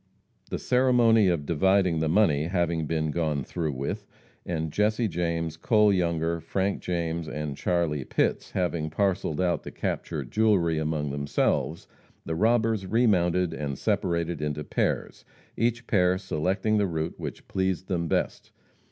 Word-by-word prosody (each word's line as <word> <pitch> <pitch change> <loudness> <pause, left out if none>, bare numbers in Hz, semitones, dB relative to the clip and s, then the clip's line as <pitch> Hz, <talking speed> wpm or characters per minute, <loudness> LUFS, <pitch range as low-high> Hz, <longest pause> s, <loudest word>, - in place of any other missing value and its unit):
The - - -2
ceremony 120 -4 +4
of 85 -5 0
dividing 90 +1 +2
the 80 0 0
money 80 -5 +3
having 85 -2 0
been 80 -1 -1
gone 75 -4 -1
through 80 +2 -3
with, 100 +11 -4 0.4
and 80 -2 -2
Jesse 110 +5 +1
James, 85 -3 -2
Cole 105 +3 +4
Younger, 85 -2 0
Frank 95 +3 -1
James 85 -2 -2
and 75 -2 -4
Charlie 80 -4 0
Pitts - - 0
having 85 -4 -1
parceled 90 -3 0
out 90 -2 +1
the - - -8
captured - - -4
jewelry 95 -8 +2
among 75 -2 -1
themselves, 70 +2 -1 0.4
the 80 - -2
robbers 110 +1 +2
remounted 90 -6 +2
and 70 -3 -4
separated 85 -2 -1
into 75 0 -2
pairs, - - -2 0.3
each 115 +1 0
pair 90 -4 +3
selecting 95 +4 0
the 100 - +2
route 80 -1 -3
which - - -7
pleased 95 -1 -1
them 85 -3 -1
best. - - -2
85 Hz, 145 wpm, -27 LUFS, 80-100 Hz, 0.4 s, ceremony